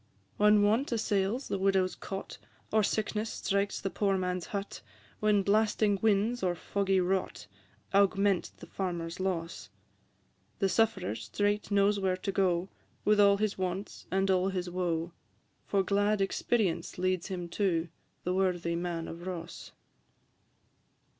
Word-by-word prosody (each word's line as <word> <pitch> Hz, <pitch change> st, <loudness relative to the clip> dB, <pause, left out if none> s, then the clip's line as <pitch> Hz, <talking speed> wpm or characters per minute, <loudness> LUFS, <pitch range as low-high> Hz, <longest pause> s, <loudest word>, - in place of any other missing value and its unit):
IV. 100 Hz, -2 st, -36 dB
When 210 Hz, 0 st, +6 dB
want 225 Hz, +7 st, +2 dB
assails 215 Hz, +2 st, 0 dB
the 195 Hz, -, -2 dB
widow's 190 Hz, -1 st, +2 dB
cot, 195 Hz, -1 st, -7 dB, 0.3 s
Or 220 Hz, -, +5 dB
sickness 215 Hz, +1 st, -1 dB
strikes 200 Hz, 0 st, -1 dB
the 195 Hz, -, -3 dB
poor 195 Hz, -2 st, +1 dB
man's 180 Hz, -1 st, -2 dB
hut, 200 Hz, -1 st, -5 dB, 0.4 s
When 210 Hz, -2 st, +3 dB
blasting 210 Hz, 0 st, +2 dB
winds 220 Hz, +3 st, +2 dB
or 180 Hz, -2 st, +1 dB
foggy 195 Hz, +2 st, 0 dB
rot 185 Hz, +1 st, -1 dB, 0.5 s
Augment 195 Hz, -1 st, +3 dB
the -, -, -11 dB
farmer's 170 Hz, -1 st, -4 dB
loss: 180 Hz, -3 st, -3 dB, 0.9 s
The 195 Hz, -, +1 dB
sufferer 200 Hz, -, +1 dB
straight 205 Hz, -, -1 dB
knows 200 Hz, 0 st, +3 dB
where 190 Hz, -1 st, 0 dB
to 195 Hz, -, -3 dB
go, 185 Hz, -2 st, +1 dB, 0.4 s
With 210 Hz, 0 st, +4 dB
all 200 Hz, -1 st, +6 dB
his 210 Hz, -1 st, -1 dB
wants 185 Hz, +2 st, -4 dB
and 195 Hz, +1 st, +1 dB
all 185 Hz, 0 st, +2 dB
his 180 Hz, -2 st, -3 dB
woe; 175 Hz, -2 st, -1 dB, 0.6 s
For 195 Hz, -1 st, +2 dB
glad 205 Hz, +2 st, +2 dB
experience 195 Hz, -1 st, 0 dB
leads 185 Hz, -1 st, 0 dB
him 180 Hz, -3 st, -4 dB
to 170 Hz, -4 st, 0 dB, 0.4 s
The 180 Hz, -, -1 dB
worthy 180 Hz, -3 st, 0 dB
Man 170 Hz, -1 st, -3 dB
of 170 Hz, +2 st, -8 dB
Ross. 170 Hz, -2 st, -7 dB
195 Hz, 140 wpm, -30 LUFS, 180-205 Hz, 0.9 s, When